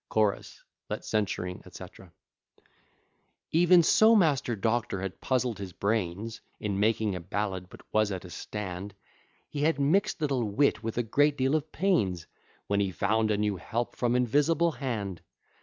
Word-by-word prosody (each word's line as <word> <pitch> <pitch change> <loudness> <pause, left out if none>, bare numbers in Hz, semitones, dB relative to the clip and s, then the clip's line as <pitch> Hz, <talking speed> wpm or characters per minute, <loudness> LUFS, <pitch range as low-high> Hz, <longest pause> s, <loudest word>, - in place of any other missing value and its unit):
CHO. 105 -2 +3 0.5
Let - - -4
censuring, 90 -4 -2
&c. - - -10
III - - -13 1.4
Even 175 +1 +6
so 220 +7 +6
Master 145 - +2
Doctor 110 -1 -1
had 95 -1 -6
puzzled 125 -4 0
his 95 -3 -6
brains 105 +2 -2 0.2
In 100 -2 -2
making 110 -1 +2
a 90 - -4
ballad, 95 0 -3
but - - -13
was 110 -1 +2
at 95 -1 -5
a 90 - -10
stand; 100 -1 -6 0.5
He 145 - -5
had 155 -1 +2
mixt 160 +9 +2
little 140 -5 0
wit 105 +2 +1
with 115 0 -4
a 120 - +2
great 145 +6 +2
deal 130 +2 +1
of 155 0 -1
pains, 105 - +1 0.4
When 100 0 0
he 100 -1 +1
found 110 +6 +1
a 105 - +2
new 105 -2 0
help 120 +6 -3
from 120 0 +1
invisible 145 +7 +2
hand. 110 - -4
110 Hz, 160 wpm, -28 LUFS, 100-140 Hz, 1.4 s, Even